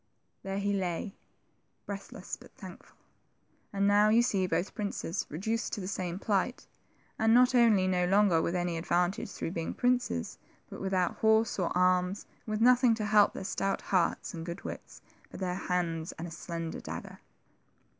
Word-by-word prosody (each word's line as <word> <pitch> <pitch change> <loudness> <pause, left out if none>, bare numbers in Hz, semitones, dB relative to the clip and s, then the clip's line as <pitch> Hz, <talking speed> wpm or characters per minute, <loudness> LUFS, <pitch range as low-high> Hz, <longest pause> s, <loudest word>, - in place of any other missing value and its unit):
There 195 0 -4
he 200 0 0
lay, 190 +1 -2 0.7
breathless 200 -1 -6
but - - -17
thankful; - - -12 0.7
and 200 0 +1
now 205 +1 +5
you 230 +2 +5
see 195 -6 +1
both 180 +1 -1
princes 200 -3 -3
reduced 220 +9 -2
to - - -2
the 185 - -5
same 185 -2 -3
plight, 205 +4 -1 0.5
and 225 +1 +4
not 250 +1 +5
only 225 -6 +5
no 180 -1 +1
longer 195 -3 +4
with 170 - -1
any 175 -1 -1
advantage 175 +4 0
through 165 - -4
being 165 -2 -4
princes, 245 - 0 0.3
but - - -8
without 190 -2 0
horse 220 -1 +3
or 180 - 0
arms, 180 +1 +2 0.2
and - - -4
with 215 - -1
nothing 245 -1 +5
to 215 -1 -3
help 210 0 +5
their - - -5
stout 195 +1 -2
hearts 180 -3 +1
and 165 -2 -6
good 170 +2 -6
wits - - -8 0.3
but - - -10
their 185 -2 -1
hands 170 -3 -2
and 170 - -7
a - - -9
slender 165 0 -5
dagger - - -8
195 Hz, 170 wpm, -30 LUFS, 175-210 Hz, 0.7 s, now